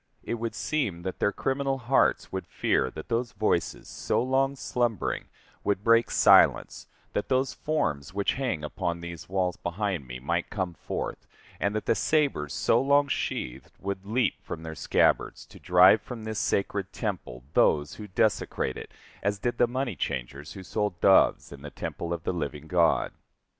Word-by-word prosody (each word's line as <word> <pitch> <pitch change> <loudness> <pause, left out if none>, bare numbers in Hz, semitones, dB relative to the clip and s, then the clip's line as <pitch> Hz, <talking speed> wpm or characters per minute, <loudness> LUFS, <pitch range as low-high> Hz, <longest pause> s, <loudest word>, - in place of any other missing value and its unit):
It 120 - -3
would 115 -1 -3
seem 105 - -2
that 95 0 -4
their 100 - +2
criminal 135 +5 -1
hearts 130 +1 +2
would - - -4
fear 65 - +1
that 80 - -9
those 115 -2 -1
voices, 100 -6 -1
so - - -1
long 135 +2 +1
slumbering, 120 -6 -1 0.4
would 100 -1 0
break 115 +1 +4
silence, - - +4 0.3
that 105 - -2
those 130 0 +1
forms 80 - -1
which 100 +1 0
hang 125 - -2
upon 85 +2 -3
these 85 -2 -8
walls 90 -2 0
behind 85 -5 -3
me 60 0 -7
might 85 +6 -1
come 95 -4 -3
forth, - - -5 0.3
and 100 +1 0
that 110 - -2
the - - +3
sabers 140 - +1
so 115 - +2
long 140 +1 +3
sheathed 65 - -3
would 95 -1 -4
leap 115 +5 0
from 80 - -7
their 80 -1 -6
scabbards - - +1
to - - -15
drive 90 +4 +6
from 120 -3 -8
this 110 -1 -3
sacred 100 -1 -1
temple 95 - -4
those 75 -1 +3
who 105 - -7
desecrate 100 -9 0
it - - -9 0.3
as 100 +1 0
did 120 +4 -2
the 120 - +5
money 125 -3 -2
changers 70 +1 -4
who 95 - -9
sold 105 0 -2
doves 95 +2 +4
in 70 -1 -10
the 75 - -7
temple 85 +3 -5
of 85 -2 -3
the - - -1
living 75 -3 -4
God. 85 0 +2
100 Hz, 175 wpm, -27 LUFS, 85-120 Hz, 0.4 s, drive